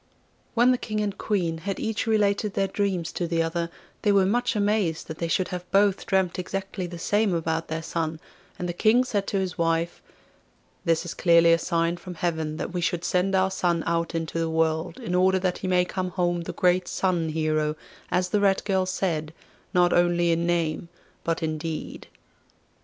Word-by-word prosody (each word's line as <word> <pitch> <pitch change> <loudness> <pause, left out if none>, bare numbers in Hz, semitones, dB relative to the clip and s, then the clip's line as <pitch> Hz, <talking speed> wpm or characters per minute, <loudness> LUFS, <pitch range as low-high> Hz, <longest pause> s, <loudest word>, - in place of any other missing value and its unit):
When 240 +2 +5
the 250 - +1
King 215 -1 -3
and 205 -2 -2
Queen 175 -6 -1
had 195 +3 -4
each 220 0 -2
related 210 -1 +1
their 195 - +2
dreams 190 -4 -1
to 175 - -2
the 165 0 +1
other, 170 +1 -2 0.3
they 210 - +3
were 195 -1 +4
much 245 +5 +1
amazed 205 -5 +1
that 160 - -7
they 170 - -1
should 180 +2 +1 0.2
both 200 -1 +4
have - - -11
dreamt 190 -2 +1
exactly 190 0 -4
the 175 0 -8
same 205 +2 +1
about 165 0 -1
their 160 0 -4
son, 160 -1 -2 0.4
and 180 - -3
the 175 - -2
King 225 +7 +4
said 205 -6 -2
to 200 - 0
his 185 -2 -2
wife, 165 0 0 0.8
'This 165 0 +2
is 175 - -4
clearly 170 -1 +5
a 165 - +3
sign 170 0 0
from 180 0 -9
heaven 160 -3 -2
that 175 - -4
we 180 - -1
should 175 0 -1
send 190 +2 +1
our 190 0 +2
son 175 -3 0
out 165 0 -1
into 165 0 -2
the 165 0 0
world 160 +1 0
in 175 - -4
order 185 +1 +4
that 185 -1 -1
he 185 - -4
may 180 -1 +3
come 185 0 -3
home 175 -1 0
the 170 - -6
great 180 0 +2
Sun 175 -4 0
Hero, 155 -1 0 0.3
as 180 0 +1
the 210 - +2
Red 195 -1 +3
Girl 190 -2 +1
said, 165 -5 -1 0.4
not 175 -1 +3
only 175 -1 +3
in 170 +1 +1
name 170 -1 0 0.3
but 165 0 -1
in 155 -1 -1
deed. 160 0 -5
175 Hz, 200 wpm, -25 LUFS, 165-195 Hz, 0.8 s, When